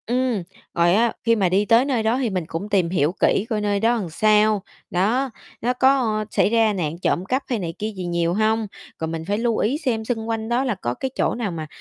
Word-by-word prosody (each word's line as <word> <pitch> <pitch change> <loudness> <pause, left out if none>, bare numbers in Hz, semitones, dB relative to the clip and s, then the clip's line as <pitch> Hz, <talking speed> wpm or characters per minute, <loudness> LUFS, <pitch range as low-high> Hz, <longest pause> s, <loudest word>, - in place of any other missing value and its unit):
Ừm, 245 -4 0 0.3
rồi 170 +1 +3
á 230 +2 +3
khi 230 0 +3
mà 195 -5 +2
đi 195 +3 +2
tới 230 +4 +4
nơi 255 -6 0
đó 225 +3 +2
thì 245 - 0
mình 185 -4 -2
cũng 180 +6 -5
tìm 190 -5 +2
hiểu 165 -3 +1
kỹ 200 - +2
coi 215 -2 -1
nơi 205 -1 0
đó 230 +2 +2
sao? 215 +2 +3 0.3
Đó, 225 +10 +1 0.3
nó 245 +2 +1
có 250 -5 +2
xảy - - +2
ra 225 -1 +3
nạn 165 -5 -2
trộm 180 - 0
cắp 260 +7 -1
hay 240 -4 0
này 170 -3 -4
kia 215 +1 -2
gì 185 -1 -5
nhiều 170 -1 0
hông? 220 +2 +1 0.3
Rồi 160 - -2
mình 160 0 -5
phải 205 +3 -1
lưu 230 0 0
ý 250 +7 +1
xem 245 -8 -2
xung 225 -1 -3
quanh 225 0 -2
đó 240 +2 +1
là 250 -5 -1
có 120 -10 -3
cái 260 - -4
chỗ - - 0
nào 225 -5 -2
mà 160 -2 -5
215 Hz, 245 wpm, -22 LUFS, 185-235 Hz, 0.3 s, tới